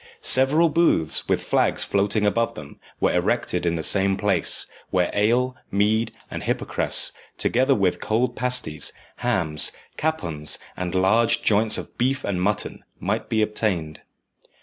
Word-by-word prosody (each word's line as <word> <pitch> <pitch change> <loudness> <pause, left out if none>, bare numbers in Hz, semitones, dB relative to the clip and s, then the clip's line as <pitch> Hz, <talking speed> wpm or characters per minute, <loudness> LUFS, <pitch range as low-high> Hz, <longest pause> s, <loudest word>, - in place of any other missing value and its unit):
Several 140 +6 +4
booths, 150 - +2
with - - +1
flags - - +2
floating 100 +2 0
above 115 +3 0
them, - - -11 0.2
were - - +1
erected 85 - 0
in 85 - 0
the 80 - -4
same 95 +1 +4
place, 100 -5 +2 0.2
where 90 -2 0
ale, 120 +5 +1
mead, 110 +3 +1 0.2
and - - -5
hypocras, - - +1 0.3
together 130 +3 +2
with 95 -4 0
cold 120 +3 0
pasties, 125 -12 -2 0.2
hams, 90 - 0 0.3
capons, 85 - -2 0.2
and 90 0 -4
large 110 +5 +2
joints 110 +1 +3
of - - -8
beef 130 +2 0
and 95 -3 -2
mutton, 105 +3 -2 0.2
might - - -3
be 110 -1 +1
obtained. 95 -8 -2
105 Hz, 140 wpm, -23 LUFS, 90-120 Hz, 0.3 s, Several